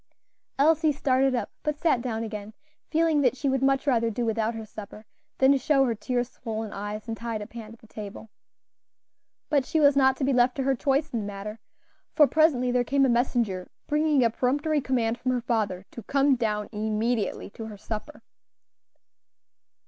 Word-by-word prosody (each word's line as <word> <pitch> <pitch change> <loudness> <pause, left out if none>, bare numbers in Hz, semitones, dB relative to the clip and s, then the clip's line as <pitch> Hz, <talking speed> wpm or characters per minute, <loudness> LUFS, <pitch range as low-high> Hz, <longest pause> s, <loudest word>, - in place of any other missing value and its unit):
Elsie 310 +2 +4
started 270 -2 +2
up, 235 -4 -3
but 300 -1 -2
sat 300 -7 +2
down 230 -2 -3
again, 215 -1 -7 0.3
feeling 320 -2 +2
that 255 -2 +2
she 280 - -2
would 265 -1 +1
much 270 0 +2
rather 235 -5 +2
do 235 +2 -2
without 225 0 0
her 225 -1 -6
supper 215 0 -10 0.3
than 270 +1 +5
show 270 +1 +3
her 240 - 0
tear 245 +3 -1
swollen 225 -3 -6
eyes 205 +2 -5
and 225 - -3
tied 230 -1 -4
up 210 - -9
hand 225 -1 -9
at - - -26
the - - -17
table. 210 0 -9 1.2
But 285 -3 +2
she 315 - 0
was 285 -2 +5
not 265 -1 +4
to - - -3
be 270 +1 +2
left 250 0 +3
to 270 - -1
her 270 +1 +2
choice 275 +4 0
in 235 - 0
the 210 - -4
matter, 205 +2 -7 0.6
for 300 - +7
presently 285 -5 +3
there 245 0 +2
came 275 +3 +2
a - - +2
messenger 235 -6 0 0.2
bringing 300 -2 +2
a 230 - +3
peremptory 290 +6 0
command 240 -3 0
from 255 0 0
her 245 - -1
father 215 -6 -1
"to 235 - -8
come 275 +4 +2
down 210 -3 -1
immediately 215 0 -1
to 225 +1 -8
her 210 -2 -9
supper." 220 +8 -7
245 Hz, 190 wpm, -26 LUFS, 220-275 Hz, 1.2 s, for